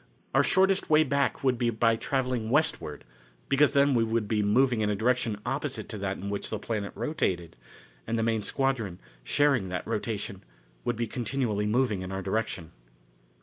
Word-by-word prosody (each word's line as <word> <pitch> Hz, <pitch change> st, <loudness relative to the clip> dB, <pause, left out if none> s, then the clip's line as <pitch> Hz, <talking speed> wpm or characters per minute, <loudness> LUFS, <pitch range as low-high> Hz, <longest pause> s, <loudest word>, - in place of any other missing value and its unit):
Our -, -, +5 dB
shortest 190 Hz, 0 st, +3 dB
way 155 Hz, 0 st, +6 dB
back 140 Hz, -1 st, 0 dB
would 130 Hz, -3 st, +2 dB
be 120 Hz, -2 st, +2 dB
by 115 Hz, 0 st, +2 dB
travelling 125 Hz, -2 st, -1 dB
westward, 130 Hz, -, 0 dB, 0.5 s
because 140 Hz, +1 st, +4 dB
then 140 Hz, -1 st, +4 dB
we 115 Hz, -2 st, +3 dB
should 115 Hz, -1 st, 0 dB
be 105 Hz, 0 st, +1 dB
moving 120 Hz, +3 st, +3 dB
in 105 Hz, -, +1 dB
a 105 Hz, -, +1 dB
direction 115 Hz, -1 st, +1 dB
opposite 135 Hz, +2 st, -3 dB
to 110 Hz, -, -5 dB
that 95 Hz, 0 st, -2 dB
in 100 Hz, -, -6 dB
which 100 Hz, 0 st, -3 dB
the 110 Hz, -, -2 dB
planet 105 Hz, -1 st, -3 dB
rotated, 90 Hz, -, -2 dB, 0.5 s
and 115 Hz, -, 0 dB
the 115 Hz, -, +1 dB
main 110 Hz, -1 st, +1 dB
squadron, 115 Hz, -7 st, -1 dB, 0.3 s
sharing 135 Hz, -, +2 dB
that 90 Hz, 0 st, -3 dB
rotation, -, -, -3 dB, 0.4 s
would 120 Hz, -, 0 dB
be 115 Hz, +1 st, -1 dB
continually 115 Hz, -3 st, -1 dB
moving 110 Hz, -3 st, +1 dB
in 95 Hz, 0 st, -6 dB
our 95 Hz, 0 st, -3 dB
direction. 95 Hz, -5 st, -2 dB
115 Hz, 180 wpm, -28 LUFS, 105-135 Hz, 0.5 s, way